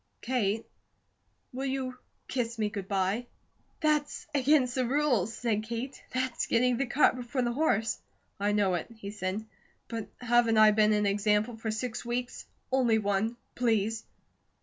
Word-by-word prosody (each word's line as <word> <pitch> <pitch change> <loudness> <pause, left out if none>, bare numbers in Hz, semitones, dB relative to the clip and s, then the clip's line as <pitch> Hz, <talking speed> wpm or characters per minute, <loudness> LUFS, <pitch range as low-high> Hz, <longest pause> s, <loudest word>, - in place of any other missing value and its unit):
Kate, 225 -4 0 0.9
will 265 +2 -2
you 260 -1 -2 0.3
kiss 235 -2 -2
me 215 -1 0
good 200 -2 -5
bye?" 195 +5 0 0.5
"That's 300 -2 +1
against 275 -2 +3
the 255 - +1
rules," 250 -7 +2
said 225 -3 -1
Kate. 235 +5 -5
"That's 255 -1 -1
getting 245 +1 +3
the 275 +1 0
cart 275 +3 +4
before 250 +1 -2
the 240 - +1
horse." 230 -6 +1 0.4
"I 205 +1 +1
know 205 -3 +2
it," 175 - -2
he 200 -2 -6
said. 205 +1 -3 0.4
"But 225 -2 -4
haven't 240 -2 +3
I 215 0 +8
been 215 0 +4
an 210 0 +2
example 210 +3 +2
for 225 0 -4
six 220 +2 -3
weeks? 245 +1 -4 0.2
Only 250 -4 +3
one. 210 +2 0 0.2
Please?" 225 -2 +1
230 Hz, 150 wpm, -29 LUFS, 210-255 Hz, 0.9 s, I